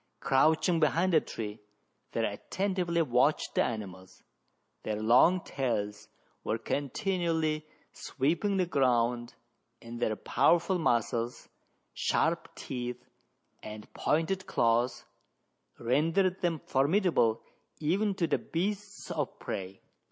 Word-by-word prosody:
Crouch 155 +4 +3
ing 170 -2 +2
behind 165 +4 +2
a 155 - +6
tree, 105 -1 -6 0.5
they - - +1
attentively 185 -3 -1
watched 130 +2 +2
the - - +3
animals, 95 -5 -6 0.6
Their 110 - -2
long 125 +12 +5
tails 105 -8 -3 0.4
were 110 - -1
continually 155 - -1 0.3
sweeping 170 +9 -1
the 185 - +2
ground, 120 -5 +1 0.4
and 115 0 -8
their 110 -2 0
powerful 170 - +2
muscles, 120 -4 0 0.5
sharp - - 0
teeth, 125 -1 -5 0.6
and 105 0 -9
pointed 185 +5 0
claws, 120 +2 +1 0.7
rendered 165 +10 +1
them 170 -4 0
formidable 140 - +2 0.4
even 195 +6 +1
to 175 - +1
the 155 - 0
beasts 205 +4 -4
of - - -3
prey. 95 0 -6
145 Hz, 105 wpm, -30 LUFS, 120-175 Hz, 0.7 s, a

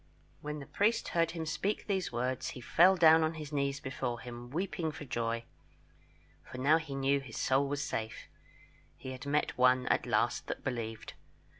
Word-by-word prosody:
When 150 0 -4
the 140 - -8
priest 225 - +1
heard 165 -2 +2
him 165 -2 -4
speak 195 +6 -2
these 190 -3 -1
words, 125 +1 -2
he - - -7
fell 180 +9 +5
down 160 -2 +7
on 160 +1 0
his 150 -2 -7
knees 140 -1 0
before 130 -3 -3
him, 120 0 -8
weeping 170 +1 -2
for 145 - -8
joy, 115 -2 -2 1.0
for - - -10
now 145 +5 +4
he 155 -4 -6
knew 135 +1 +2
his 135 -5 -9
soul 135 +2 +2
was 145 +1 -2
safe; 110 -5 -4 0.7
he 130 - -7
had 130 +2 -8
met 145 -2 0
one 125 0 +5
at - - +1
last - - +1
that - - -5
believed. 115 -4 -4
140 Hz, 180 wpm, -32 LUFS, 125-160 Hz, 1.0 s, down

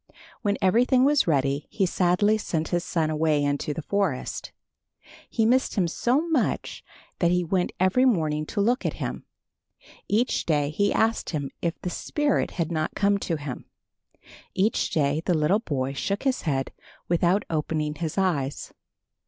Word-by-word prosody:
When 205 -3 0
everything 250 +6 +4
was 290 -5 +3
ready 140 -2 +1
he 195 - 0
sadly 185 +4 +2
sent 160 -6 -2
his 175 0 0
son 160 -3 0
away 155 -1 +1
into 145 +1 -1
the 155 +2 -5
forest. 195 -10 -2 0.8
He 225 - +1
missed 255 +3 +2
him 190 -5 +2
so 255 - 0
much 305 -8 -1 0.4
that 170 - +3
he 180 0 +2
went 180 +1 0
every 190 +8 +3
morning 155 -10 +1
to 205 - -1
look 245 +7 +1
at - - -1
him. - - -5 0.8
Each 230 +5 +1
day 145 -2 +1
he 205 +6 +1
asked 225 0 +1
him 145 -4 -3
if 170 -1 -2
the 180 - -2
spirit 295 - 0
had 170 -1 -1
not 155 -1 -2
come 200 0 +2
to 170 - -2
him. 145 -4 -6 0.9
Each 200 +4 +1
day 145 0 +1
the 175 - +3
little 155 +7 +3
boy 135 - -2
shook 200 +8 -2
his 265 -2 0
head 135 -1 -1 0.4
without 175 +3 +2
opening 155 -1 -1
his 160 +2 -4
eyes. 150 -8 -1
175 Hz, 160 wpm, -25 LUFS, 150-205 Hz, 0.9 s, everything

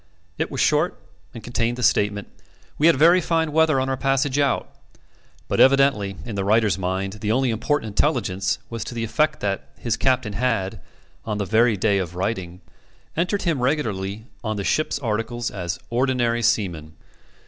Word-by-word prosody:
It - - 0
was - - -5
short, - - +2 0.3
and 115 - -10
contained 120 0 -1
the 125 - -4
statement: 105 -2 +2 0.5
"We 155 - +5
had 170 - +6
very 170 +4 +5
fine 160 -2 0
weather 155 -2 +3
on 130 - 0
our 135 - 0
passage 135 +1 +1
out." 140 -1 +1 0.8
But - - -1
evidently, 135 -7 +4
in 115 - -5
the 100 -1 -2
writer's 105 -2 +3
mind, 95 +1 -2
the 105 - 0
only 130 +1 +2
important 115 +2 -1
intelligence 100 -5 0
was 115 -4 -5
to 120 - -7
the 115 - -2
effect 150 +7 0
that 95 -9 -2
his 115 -3 -2
captain 130 -5 +1
had, 115 -4 -1 0.4
on 105 -2 -3
the 100 - -1
very 110 +2 +3
day 100 0 +2
of 90 -2 -4
writing, 90 -2 -3 0.5
entered 180 +5 0
him 160 -7 0
regularly 110 -7 -1 0.2
on 110 -1 -2
the 100 - -2
ship's 155 +9 0
articles 120 -1 -2
as 90 -3 -4
Ordinary 120 -1 +1
Seaman. 90 -9 0
115 Hz, 170 wpm, -23 LUFS, 100-135 Hz, 0.8 s, had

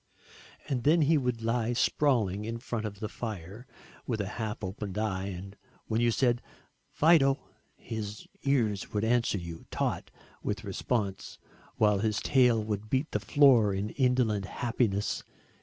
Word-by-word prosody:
And 130 -3 -1
then 155 +2 +5
he 160 +3 +4
would 125 -5 0
lie 115 +1 0
sprawling 115 -7 +2
in 115 +2 -3
front 115 -2 -3
of 100 -1 -9
the 110 - -2
fire 105 +1 -7 0.4
with 115 -4 -1
a 100 - -1 0.2
half 110 0 -4
open 95 +1 -5
eye 100 -3 -1
and 95 +1 -7 0.3
when 110 +1 0
you 120 - +4
said 120 0 +2 0.5
"Fido" 145 -4 +4 0.4
his 105 -2 -6 0.2
ears 115 -8 0
would 105 0 0
answer 115 -2 +2
you, 85 -2 -8
taut - - -2 0.3
with 105 +2 -3
response, 100 -1 -2 0.4
while 105 -2 +3
his 110 0 0
tail 125 -5 +3
would 105 0 -4
beat 135 +6 0
the - - 0
floor 125 -9 +5
in 100 +3 -2
indolent 125 -6 +1
happiness. 110 -2 -1
110 Hz, 150 wpm, -29 LUFS, 100-125 Hz, 0.5 s, then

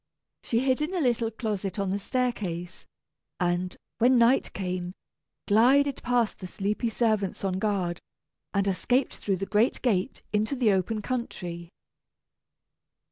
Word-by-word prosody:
She 230 0 0
hid 260 +1 +1
in 320 +5 -1
a - - +1
little 240 -5 +1
closet 210 -4 -3
on 195 -2 -1
the 200 - -1
staircase, 195 -8 -3 0.5
and, 180 0 0 0.2
when 250 +2 +5
night 240 +3 +4
came, 180 -1 -3 0.5
glided 265 +6 +4
past 240 -3 +1
the 185 - -6
sleepy 210 +5 -1
servants 215 -5 0
on 190 -1 0
guard, 190 -5 -1 0.5
and 200 0 +1
escaped 245 +7 +1
through 195 -2 -1
the 195 - -3
great 215 +5 +2
gate 200 -8 0
into 215 +6 +1
the 245 -5 +3
open 200 +3 0
country. 175 -9 -4
210 Hz, 135 wpm, -27 LUFS, 185-245 Hz, 0.5 s, when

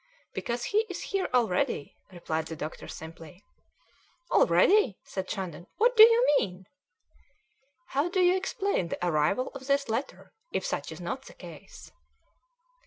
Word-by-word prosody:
"Because 240 0 -3
he 415 - +1
is 370 - -5
here 390 -2 0
already," 215 - 0 0.2
replied 160 -3 -3
the 160 - -6
doctor 155 0 -7
simply. 165 +3 -11 0.9
"Already!" 415 - +4
said 190 -1 -6
Shandon. 185 -4 -5
"What 480 +3 +3
do 440 - +8
you 465 +2 +8
mean?" 185 0 -5 1.2
"How 285 +4 0
do 370 - -1
you 360 0 +5
explain 385 - -1
the 180 - -4
arrival 155 +10 +1
of 270 -1 -9
this 280 -2 +1
letter 230 +5 -4 0.2
if - - -2
such - - -3
is - - -9
not - - -5
the - - -12
case?" - - -12
245 Hz, 145 wpm, -28 LUFS, -, 1.2 s, do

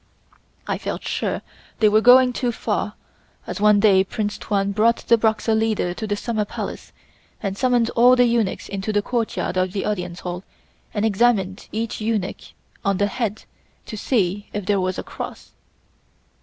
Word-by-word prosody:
I - - -2
felt - - -4
sure - - -2 0.4
they 220 - +5
were 215 +1 +4
going 250 +1 +7
too 245 0 -1
far - - -2 0.5
as - - -5
one 210 -1 +5
day 200 -3 +5
Prince 205 +1 -3
Tuan 200 -1 0
brought 220 +3 +2
the 235 - +7
Boxer 220 0 +1
leader 220 -5 +1
to 220 +4 -5
the 205 - 0
Summer 220 0 -1
Palace 205 - -6 0.5
and 195 -1 -3
summoned 245 0 +2
all 245 +2 +6
the 245 0 +5
eunuchs 230 -4 0
into 200 +2 -3
the 205 -1 +1
courtyard 230 -5 -2
of 185 0 0
the 195 - -2
Audience 180 -4 -3
Hall 180 +1 -5 0.5
and 210 0 -1
examined 200 -3 +1
each 225 0 -3
eunuch 215 -4 -2 0.4
on 200 -1 +1
the 205 - +2
head 220 0 -3 0.4
to 220 - -7
see 205 -3 0
if 205 -2 -3
there 200 -1 +2
was 185 0 -1
a - - -4
cross. - - -8
210 Hz, 170 wpm, -22 LUFS, 195-230 Hz, 0.5 s, going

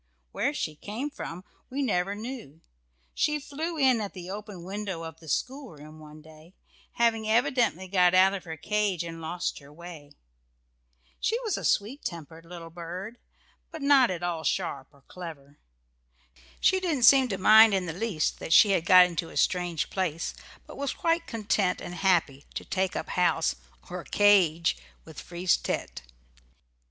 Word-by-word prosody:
Where - - 0
she 155 - -4
came 225 - -5
from 180 -9 -7 0.3
we 280 +2 -2
never 195 -4 0
knew 215 - -8 0.5
she 300 0 0
flew 315 +4 -5
in 260 -5 +3
at 205 - -5
the 180 -1 -8
open 205 -3 -8
window 190 -2 -5
of 160 0 -9
the 160 - -12
schoolroom 155 - -5
one 155 0 -13
day, 160 +3 -17 0.4
having 225 -2 +1
evidently 235 - +1
got 180 -1 +3
out 190 +1 +6
of 195 - -5
her 160 -1 -7
cage 205 0 -1
and 165 -1 -8
lost 175 +2 -3
her 140 0 -16
way. 155 -3 -11 1.1
She 460 - 0
was 440 -6 -1
a - - -5
sweet 230 +8 0
tempered 165 -1 -7
little 165 -1 -10
bird, 180 +7 -7 0.5
but 320 -3 -8
not 280 -3 +5
at 175 -2 -4
all 170 -2 -2
sharp 145 -9 -2
or 140 -2 -24
clever. 150 -6 -10 1.0
She 375 - +3
didn't 325 -9 -1
seem 265 +2 +7
to 195 -5 -3
mind 215 +2 +7
in 185 -1 -1
the 165 - -4
least 185 -4 -2
that 165 - -1
she 205 - +7
had 175 -4 +1
got 185 -1 +9
into 170 -2 -4
a - - -9
strange 175 -3 0
place, 165 -4 -2 0.3
but - - -12
was 280 -1 -2
quite 335 0 0
content 205 -4 0
and 175 - -7
happy 170 -6 +1
to - - -5
take 190 0 -1
up - - -4
house, 180 -1 +1 0.3
or - - -6
"cage," 180 - +3 0.3
with - - -10
Frise 175 +1 0
tête. - - -4
185 Hz, 165 wpm, -27 LUFS, 165-225 Hz, 1.1 s, got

